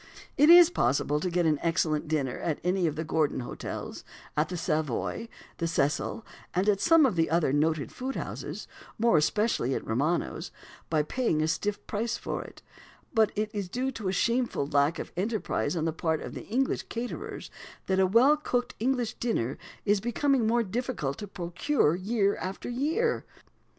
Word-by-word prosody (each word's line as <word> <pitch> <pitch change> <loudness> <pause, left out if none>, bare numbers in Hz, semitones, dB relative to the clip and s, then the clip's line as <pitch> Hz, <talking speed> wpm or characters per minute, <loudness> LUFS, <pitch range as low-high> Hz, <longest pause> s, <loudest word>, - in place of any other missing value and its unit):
It 295 +2 +5
is 350 0 +9
possible 145 - +1
to 180 - -1
get 175 0 +1
an 155 -2 +2
excellent 160 -3 0
dinner 145 -5 -1
at 160 -3 -2
any 180 0 +1
of 155 - -2
the 160 - -2
"Gordon" 155 -4 0
hotels, 120 - -6 0.3
at 150 +1 +1
the 180 - -4
"Savoy," 155 - -2 0.3
the 165 - 0
"Cecil," 165 +7 -1 0.3
and 185 +3 +1
at 200 -2 +3
some 330 -3 +6
other 165 - +2
noted 155 0 +1
food 265 +1 -4
houses - - -5 0.3
more 230 +1 +3
especially 155 - +1
at - - -4
Romano's 145 +10 -1 0.4
by 155 -2 +2
paying 155 - 0
a - - +1
stiff 205 +5 -2
price 230 +2 -2
for - - -4
it; - - -14 0.5
but 220 -3 +4
it 215 0 -1
is 200 -4 -3
due 255 +6 -1
to 225 -6 -5
a - - +1
shameful 235 - +1
lack 145 +2 +2
of - - -6
enterprise 210 -1 -1
on 160 -1 -1
the 165 - 0
part 160 -1 0
of - - -7
English 260 +5 -1
caterers 235 +1 -5 0.3
that 190 0 +1
a 190 - +5
well 245 +9 +5
cooked 245 -4 -1
English 245 0 0
dinner 135 - -1 0.3
is 205 -1 +3
becoming 240 +1 +1
more 235 +1 +3
difficult 220 - -3
to 205 - -5
procure, 175 - 0
year 200 +2 +1
after 190 +1 -5
year. 320 - 0
190 Hz, 170 wpm, -28 LUFS, 160-235 Hz, 0.5 s, is